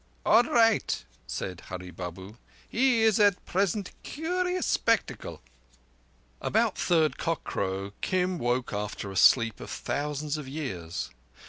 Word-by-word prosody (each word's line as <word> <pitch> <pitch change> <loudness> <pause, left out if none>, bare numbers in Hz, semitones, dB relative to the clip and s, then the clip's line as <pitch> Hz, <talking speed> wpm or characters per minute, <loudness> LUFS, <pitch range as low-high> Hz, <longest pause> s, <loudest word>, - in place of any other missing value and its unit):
"All - - +7
raight," 225 -2 +2 0.2
said 90 +9 -4
Hurree 90 0 -6
Babu. 95 +5 -8 0.3
"He 240 -2 +3
is 220 -1 +4
at 205 -3 +3
present 195 +1 0
curious 360 +3 -1
spectacle." 230 - 0 1.0
About - - +2
third 160 -3 +2
cockcrow, 100 - -2
Kim 185 -1 0
woke 120 0 0
after 105 -1 -4
a - - -8
sleep 115 +4 +5
of - - -8
thousands 150 +1 -2
of 150 -3 -7
years. 95 - -4
150 Hz, 120 wpm, -28 LUFS, -, 1.0 s, All